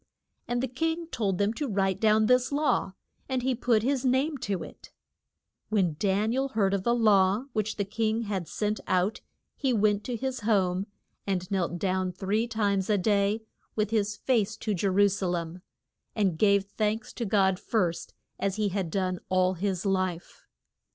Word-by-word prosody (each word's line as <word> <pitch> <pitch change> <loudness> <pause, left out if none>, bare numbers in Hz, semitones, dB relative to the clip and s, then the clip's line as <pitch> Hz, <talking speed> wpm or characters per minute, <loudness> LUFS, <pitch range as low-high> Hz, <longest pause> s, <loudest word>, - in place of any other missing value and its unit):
And 240 +1 -1
the - - +1
king 325 +7 -2
told 195 -5 -1
them 205 +3 +1
to 285 +5 -3
write 195 -4 0
down 215 0 +4
this 250 +3 +3
law, 285 -9 +1 0.4
and 260 -2 -1
he 260 0 +1
put 230 -2 +1
his 270 +1 0
name 265 +4 +2
to 200 -8 -2
it. - - -12 0.8
When 185 -7 +1
Dan 205 +2 +1
i - - -1
el 270 +1 +1
heard 205 -6 +1
of 200 - +1
the 235 +5 +2
law 210 0 +3
which 215 -1 -1
the 200 - -1
king 220 +2 -1
had 195 -6 -3
sent 210 0 -2
out 185 +3 +1 0.3
he 265 -3 0
went 210 -1 +2
to 245 - -2
his 260 +2 -3
home 195 -3 +1 0.4
and 185 -1 -2
knelt 175 -3 0
down 185 +1 0
three 200 +5 -1
times 205 -4 0
a 210 - +3
day 205 +2 +1 0.3
with 215 -1 0
his 210 -1 0
face 220 -4 0
to 215 - -2
Je 195 +1 0
ru 200 +2 +4
sa 200 -1 -2
lem, 175 0 -3 0.5
and 195 -6 +1
gave 200 -2 +4
thanks 215 +2 -2
to 240 - -4
God 195 -3 +2
first 180 -7 -1 0.2
as 195 -1 -1
he 210 -1 0
had 190 -3 -2
done 185 0 -1
all 185 0 +3
his 185 +1 -2
life. 185 -3 -2
205 Hz, 185 wpm, -28 LUFS, 190-225 Hz, 0.8 s, down